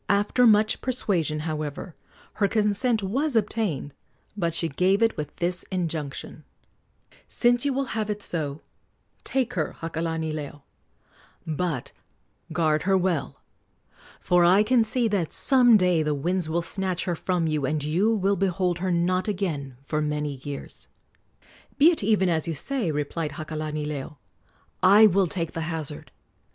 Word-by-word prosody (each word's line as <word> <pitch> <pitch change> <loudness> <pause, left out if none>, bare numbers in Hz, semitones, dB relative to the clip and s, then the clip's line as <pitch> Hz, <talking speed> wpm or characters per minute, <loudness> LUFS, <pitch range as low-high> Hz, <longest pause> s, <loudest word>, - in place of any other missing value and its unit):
After 205 +5 +3
much 215 0 +3
persuasion, 175 - 0
however, 155 +1 -4 0.5
her 200 - +5
consent 215 +2 +1
was 265 +8 -1
obtained; 205 - -1 0.4
but 170 -5 -1
she 165 +1 0
gave 185 +8 +2
it 225 - +2
with 150 -1 -6
this 175 +1 -1
injunction: 160 -6 -4 0.8
"Since 240 +1 +2
you 280 - +1
will 275 +1 -1
have 215 -1 -2
it 210 -1 -3
so, 150 -3 -4 0.6
take 260 -2 -1
her, 160 -4 -2
Hakalanileo; 160 -3 -4 0.8
but 160 -4 -3 0.6
guard 155 -3 +1
her 190 - +5
well, 180 -5 -2 0.8
for 180 -1 +3
I 185 +4 +5
can 240 +1 +3
see 230 +2 +1
that 195 -7 -1
some 245 -4 +6
day 180 -4 +2
the 150 -1 0
winds 170 +3 -1
will 170 +2 0
snatch 185 -1 -2
her 175 - -1
from 180 0 -1
you, 155 -4 0
and 150 +1 -1
you 185 +10 +1
will 200 -1 +1
behold 185 -2 0
her 185 +1 -1
not 180 +2 +1
again 160 -11 -3
for 150 +2 -2
many 150 -2 -2
years." 140 +1 -8 0.9
"Be 310 +4 +7
it 335 - 0
even 200 -2 +2
as 165 -2 0
you 165 - -2
say," 250 - -2
replied 150 +1 -3
Hakalanileo, 150 -2 -5 0.6
"I 200 +4 +7
will 195 -2 +3
take 165 0 -3
the 165 - -4
hazard. 155 -3 -4
175 Hz, 145 wpm, -25 LUFS, 155-205 Hz, 0.9 s, Be